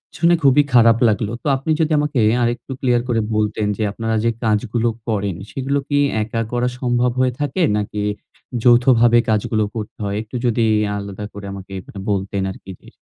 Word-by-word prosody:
শুনে 170 +4 +4
খুবই 140 +1 +5
খারাপ 115 -2 +6
লাগলো। 105 0 0
তো - - -3
আপনি 135 +4 -7
যদি 160 -1 +1
আমাকে 150 -3 0 0.2
আরেকটু 120 +3 -2
ক্লিয়ার 125 -2 +2
করে 115 -3 +1
বলতেন 105 0 0
যে - - -4
আপনারা 115 +2 -2
যে 115 - +3
কাজগুলো 110 +2 0 0.2
করেন, 100 -4 -1 0.2
সেগুলো 135 +4 -1
কি 145 - +1 0.3
একা 115 +2 -3
করা 120 0 0
সম্ভব 125 -1 +1
হয়ে 130 -1 +2
থাকে? 145 +5 -1 0.2
নাকি 105 0 -3 0.6
যৌথভাবে 120 -1 +5
কাজগুলো 110 0 +1
করতে 110 -2 -6
হয়? 100 0 -2
একটু 110 +3 -10
যদি 120 -1 +1 0.4
আলাদা 100 0 -6
করে 100 0 -8
আমাকে 95 0 -10
অ্যা 100 - -10
বলতেন 100 0 -1
আরকি 95 0 -11
যে - - -18
115 Hz, 175 wpm, -19 LUFS, 105-125 Hz, 0.6 s, খারাপ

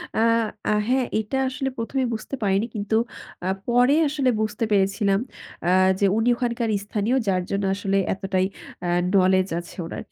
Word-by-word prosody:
আ - - +1 0.5
আ - - +3 0.2
হ্যাঁ 255 0 +2
এটা 220 +5 -2
আসলে 265 +1 -2
প্রথমেই 250 +3 -1
বুঝতে 225 +5 -5
পারিনি 195 +1 +2
কিন্তু 210 +1 -1 0.5
আ - - 0 0.2
পরে 245 +3 +4
আসলে 280 -3 +1
বুঝতে 215 +1 -2
পেরেছিলাম 195 0 +2 0.5
আ - - +4 0.3
যে 200 - +3
উনি 225 +2 +1
ওখানকার 235 -2 -1 0.2
স্থানীয় 210 +4 0
যার 185 -2 +1
জন্য 200 0 0
আসলে 195 0 0 0.2
এতটাই 190 -1 -1 0.4
আ - - -1 0.3
নলেজ 185 0 +4
আছে 175 - -11
ওনার। - - -6
210 Hz, 160 wpm, -24 LUFS, 195-245 Hz, 0.5 s, পরে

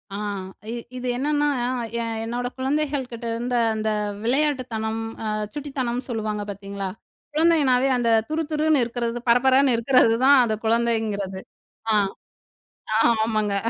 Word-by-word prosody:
ஆ. - - -3 0.5
இ - - -3 0.2
இது 250 0 -4
என்னன்னா, 295 +2 +1 0.5
எ - - 0
என் 225 -1 -3
என்னோட 245 +2 -2
குழந்தைகள்கிட்ட 265 -3 -2
இருந்த 245 +1 -2 0.2
அந்த 220 0 -1 0.3
விளையாட்டுத்தனம், 240 -5 0 0.2
அ - - -3 0.3
சுட்டித்தனம்ன்னு 260 -4 -3
சொல்லுவாங்க 215 -2 -2
பாத்தீங்களா? 200 -1 -5 0.4
குழந்தைங்கனாவே 290 -5 +3
அந்த 235 -1 +1 0.2
துருதுருன்னு 310 -2 +1
இருக்குறது, 235 0 -2
பரபரன்னு 260 +2 +5
இருக்குறது 235 -1 +4
தான் 280 0 +7
அந்த 220 -1 0
குழந்தைங்கிறது. 220 -4 0 0.5
ஆ, - - +3 1.0
ஆ, - - +2 0.3
ஆமாங்க 215 -2 0
245 Hz, 120 wpm, -23 LUFS, 225-275 Hz, 1.0 s, தான்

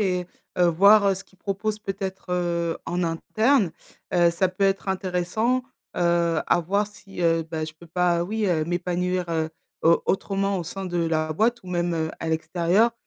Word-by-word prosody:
et 180 -3 0 0.3
heu, 180 - +5
voir 200 +4 +6
ce 190 - -9
qu'ils 190 - -27
proposent 205 +2 -2
peut-être, 195 -2 -5
heu, 170 -2 0
en 175 +1 -1
interne. 210 - +1 0.4
Heu, 175 -1 +5
ça 180 +2 +1
peut 185 +2 -1
être 195 0 +1
intéressant, 190 +6 0 0.3
heu, 170 -2 +2
à 175 - +3
voir 200 +5 0
si, 205 -3 -11
heu, 165 -1 +3
bah, 160 -1 -2
je 155 - -7
peux 170 - -13
pas, 175 0 +2
oui, 215 +3 -1
heu, 160 -4 +1
m'épanouir, 180 +1 -1
heu, 160 -1 -1 0.3
au 165 +1 +4
autrement 195 0 0
au - - -2
sein 195 +4 -6
de 175 -1 -2
la 160 -1 0
boîte 230 +7 +1
ou - - -10
même, 175 -1 0
heu, 160 -1 -1
à 165 - -3
l'extérieur. 175 +7 +2
180 Hz, 185 wpm, -24 LUFS, 170-195 Hz, 0.4 s, voir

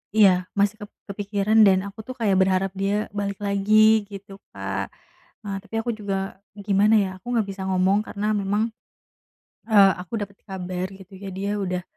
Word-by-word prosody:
iya 205 -3 +7 0.3
masih 205 +1 +3
kep 205 - -9 0.2
kepikiran 205 +2 +1
dan 190 -1 +5
aku 205 +2 -12
tuh 255 - -6
kayak 200 -4 +2
berharap 190 0 +2
dia 200 +2 -1
balik 200 -1 -3
lagi 215 +1 +4
gitu 195 0 -10 0.2
Kak, 95 0 -3 0.6
eee, 200 -1 -4
tapi 225 - -8
aku 240 - -1
juga 195 -2 -4 0.2
gimana 205 +1 +3
ya 195 -2 0
aku 240 +5 -4
gak 225 - +3
bisa 195 -1 -6
ngomong 190 +3 +2
karena 210 +1 -2
memang, 205 +3 0 1.0
eee, 200 -3 +7
aku 185 +5 -5
dapat 200 0 -7
kabar 185 -1 -4
gitu 190 0 -15
ya 200 - -7
dia 200 +2 -2
udah, 180 -2 -2
200 Hz, 170 wpm, -24 LUFS, 190-210 Hz, 1.0 s, iya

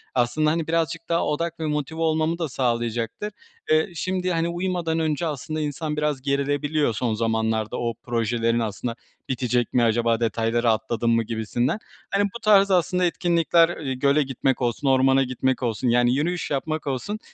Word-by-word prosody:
aslında, 130 +5 +2
hani, 165 -1 -1
birazcık 165 0 -1
daha 170 0 +1
odak 165 +3 -2
ve 160 - -2
motive 150 +1 -2
olmamı 160 +1 +1
da 165 -3 -2
sağlayacaktır. 120 - -2 0.4
Eee, 155 +4 +3
şimdi, 185 +2 -1
hani, 165 0 0
uyumadan 175 -2 -1
önce 160 +1 0
aslında 155 +1 -4
insan 150 +1 -3
biraz 150 -3 0
gerilebiliyor 145 0 0
son 115 +1 -1
zamanlarda, 110 0 -1
“o 120 -1 -1
projelerin 115 0 0
aslında 115 +1 -3 0.3
bitecek 125 -2 0
mi, 120 - +3
acaba 115 0 +2
detayları 115 +1 +1
atladım 115 +1 0
mı“ 115 - +2
gibisinden. 115 - -1 0.3
Hani, 200 +1 +2
bu - - -5
tarz 200 -3 +5
aslında 180 0 +2
etkinlikler; 170 -1 +2
eee, 135 -4 -3
göle 140 +3 +2
gitmek 135 0 -1
olsun, 120 +3 -1
ormana 135 0 +4
gitmek 130 0 -1
olsun, 115 +1 -1
yani 120 +1 +3
yürüyüş 165 +4 -1
yapmak 155 +2 -2
olsun, 140 - -3
140 Hz, 165 wpm, -24 LUFS, 120-165 Hz, 0.4 s, tarz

